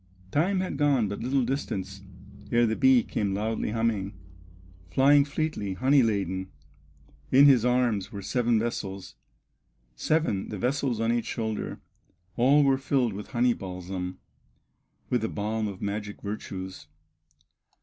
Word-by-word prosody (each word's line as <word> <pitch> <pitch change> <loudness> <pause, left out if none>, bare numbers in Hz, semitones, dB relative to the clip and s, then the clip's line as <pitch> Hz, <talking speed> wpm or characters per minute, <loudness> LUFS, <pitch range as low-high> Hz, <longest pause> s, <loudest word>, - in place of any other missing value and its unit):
Time 185 - +1
had 185 -6 -3
gone 140 -6 +2
but 100 +1 -5
little 130 +2 +1
distance, 100 -7 -3 0.5
Ere 120 0 +4
the 110 -1 0
bee 130 -2 +5
came 100 -2 -2
loudly 110 +2 -2
humming, 110 -3 -1 0.7
Flying 140 - +5
fleetly, 140 -9 -3
honey 135 +6 +4
laden; 95 -4 -1 0.8
In 135 +2 +7
his 130 -5 +6
arms 120 -5 +1
were 100 -1 -7
seven 120 +1 +1
vessels, 100 -4 -4 0.8
Seven, 150 - 0
the 105 - -5
vessels 125 +1 -1
on 115 0 +1
each 120 -1 -1
shoulder; 110 -2 -4 0.5
All 140 +5 +5
were 135 -1 +3
filled 130 -4 +1
with 100 +2 -7
honey 120 -1 +2
balsam, 90 -1 -6 0.9
With 125 -2 +2
the 110 - -1
balm 110 +1 -2
of 100 -1 -7
magic 105 0 -4
virtues. 95 -5 -6
115 Hz, 135 wpm, -27 LUFS, 100-130 Hz, 0.9 s, In